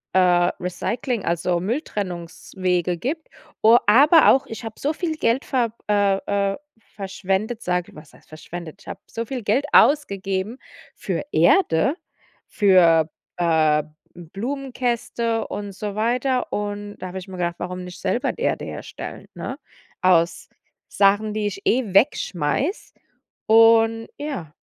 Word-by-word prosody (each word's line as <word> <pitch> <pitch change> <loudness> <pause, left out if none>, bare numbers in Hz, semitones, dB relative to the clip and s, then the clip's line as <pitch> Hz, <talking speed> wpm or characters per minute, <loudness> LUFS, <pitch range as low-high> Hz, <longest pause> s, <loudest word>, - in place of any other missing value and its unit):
äh, 180 -1 +4
Recycling, 225 +5 -3
also 170 +1 0
Mülltrennungswege 180 - -3
gibt 300 - -4 0.3
o 225 +2 +7
aber 290 +10 +6
auch, 265 - +3
ich 225 +2 -8
habe 225 -1 -7
so 290 - 0
viel 320 0 -3
Geld 245 -2 +1
ver 245 -4 0 0.2
äh, 205 -2 +3 0.4
äh, - - -7 0.4
verschwendet, 195 +3 -2
sage 180 0 -2
was 150 -1 -14
heißt - - -21
verschwendet? 170 +3 -9
Ich - - -20
habe - - -7
so 230 - -5
viel 255 -1 -5
Geld 230 +8 +1
ausgegeben 200 -6 +2 0.4
für - - -3
Erde, 175 - +3 0.5
für, 170 -6 +4 0.3
äh, 160 -3 +3 0.3
Blumenkästen 235 - -3
und 205 -1 -6
so 205 +1 -5
weiter, 250 +4 0
und 205 0 -4
da 185 - -6
habe 190 +1 -6
ich 185 - -11
mir 190 -1 -9
gedacht: 175 -1 -1
„Warum 180 +1 -5
nicht 180 0 -10
selber 245 - -1
Erde - - -1
herstellen, - - -8
ne, - - -6 0.4
aus 170 -2 +2 0.4
Sachen, 205 +2 +2
die 215 -1 -1
ich 195 -1 -6
eh 230 -5 +1
wegschmeiße?“ 200 - +1 0.5
Und 225 0 +5
ja. 270 - -6
205 Hz, 135 wpm, -22 LUFS, 180-235 Hz, 0.5 s, o